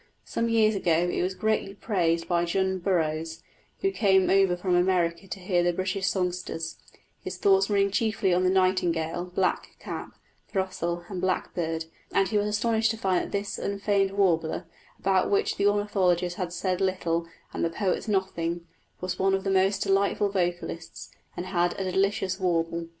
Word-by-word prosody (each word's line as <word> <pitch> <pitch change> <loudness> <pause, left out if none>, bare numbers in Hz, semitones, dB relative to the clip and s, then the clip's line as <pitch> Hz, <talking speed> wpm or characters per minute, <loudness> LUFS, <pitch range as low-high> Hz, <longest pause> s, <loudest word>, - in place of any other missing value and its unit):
Some 230 0 -1
years 220 -1 +4
ago 175 -3 +2
it - - -1
was 185 +1 -1
greatly 215 -2 -1
praised 170 -6 0
by 175 -1 +2
John 190 +2 0
Burroughs, 165 -3 -1 0.4
who 390 - +2
came 190 - +3
over 190 -2 +4
from 180 0 -1
America 175 -1 +1
to 195 - -6
hear 180 -1 +1
the 175 0 +2
British 185 +1 -1
songsters, 180 -3 -2 0.4
his 185 0 -5
thoughts 195 +1 +3
running 200 -1 +2
chiefly 205 -3 +1
on 180 +1 +2
the 185 - +3
nightingale, 175 -3 +1
blackcap, 180 +1 -3 0.3
throstle, 175 -3 -2
and 185 -2 -5
blackbird; 165 -3 -1 0.3
and 195 -1 +2
he 215 - +1
was 205 - 0
astonished 220 +1 +1
to 225 - -2
find 190 -4 +1
that - - -10
this 200 0 -3
unfamed 200 -1 0
warbler, 175 -3 +1 0.3
about 190 -1 +2
which 200 - +1
the 200 - +3
ornithologists 185 -4 +1
had 180 -2 -2
said 185 +1 -1
little 170 -3 0 0.3
and - - -2
the 170 - +2
poets 190 +5 -1
nothing, 175 -4 -1 0.4
was 185 0 -3
one 195 0 +3
of 195 - -3
the 195 - 0
most 195 +1 +2
delightful 200 +1 +2
vocalists, 175 -3 -3 0.3
and 175 - -3
had 175 -1 0
a 190 -1 -1
"delicious 190 0 0
warble." 170 -2 0
185 Hz, 165 wpm, -27 LUFS, 175-195 Hz, 0.4 s, years